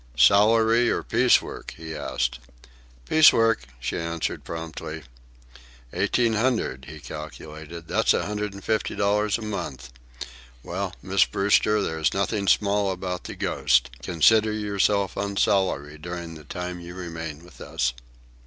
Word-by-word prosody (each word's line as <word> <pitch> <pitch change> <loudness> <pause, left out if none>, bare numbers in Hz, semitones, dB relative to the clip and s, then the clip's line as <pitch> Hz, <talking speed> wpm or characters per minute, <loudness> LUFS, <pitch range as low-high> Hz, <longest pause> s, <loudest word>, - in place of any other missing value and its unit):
"Salary, 110 - +5
or - - -1
piece - - +4
work?" - - -8
he 80 0 -7
asked. 65 -4 -2 0.7
"Piece 155 0 +7
work," 115 0 +2
she 65 +3 -3
answered 85 0 -3
promptly. 80 -1 -6 0.9
"Eighteen 120 -2 +1
hundred," 110 - 0
he 80 0 -9
calculated. 80 +4 -9
"That's - - +2
a - - -1
hundred 105 -1 -3
and 100 - -10
fifty 110 -1 -1
dollars 105 +1 +1
a 115 - -8
month. 70 - -5 0.7
Well, 95 +1 -4
Miss 95 +1 +3
Brewster, 105 +1 +2
there 80 -3 -3
is 70 -6 +1
nothing 100 -2 -1
small 100 -1 +2
about 90 -1 -4
the - - -6
Ghost. - - +1
Consider 110 +6 +4
yourself 100 -2 0
on 100 0 -3
salary 75 -8 +1
during 85 +1 -6
the 75 -2 -12
time 90 +2 -5
you 85 +1 -9
remain 80 -3 -6
with 90 - -16
us." - - -1
90 Hz, 145 wpm, -25 LUFS, 80-105 Hz, 0.9 s, Piece